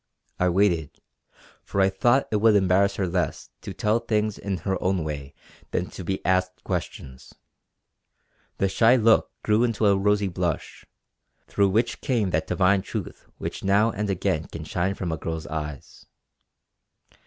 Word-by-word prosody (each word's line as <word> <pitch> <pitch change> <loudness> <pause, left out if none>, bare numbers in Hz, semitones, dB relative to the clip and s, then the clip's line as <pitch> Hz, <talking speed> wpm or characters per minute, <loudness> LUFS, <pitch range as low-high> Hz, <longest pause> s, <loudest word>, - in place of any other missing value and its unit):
I 90 - +3
waited, 85 -5 +1 0.6
for 100 - -3
I 95 0 +5
thought 120 +8 +2
it 105 - +2
would 110 0 +4
embarrass 100 0 +3
her 95 - -1
less 90 -1 -2
to - - -7
tell 105 +2 +1
things 110 -2 -1
in 100 -2 -3
her 95 -2 -1
own 95 -3 0
way 70 -2 -6 0.3
than 90 - -2
to 95 - -8
be 95 +3 -3
asked 95 0 0
questions. 65 -1 -6 1.2
The 100 - +2
shy 115 +5 +4
look 115 -2 +4
grew 105 +2 +3
into 115 -3 0
a 100 -1 +5
rosy 105 +1 +2
blush, 85 -3 -3 0.6
through 100 -1 +2
which 115 +5 0
came 110 -8 0
that 80 -1 0
divine 95 +1 +3
truth - - -7
which - - -6
now 100 +4 +3
and 105 0 -3
again 80 -4 -1
can 80 - -8
shine 90 +5 -1
from 90 -4 -3
a 80 - -2
girl's 80 +1 -5
eyes. 75 -3 -7
95 Hz, 160 wpm, -25 LUFS, 85-105 Hz, 1.2 s, I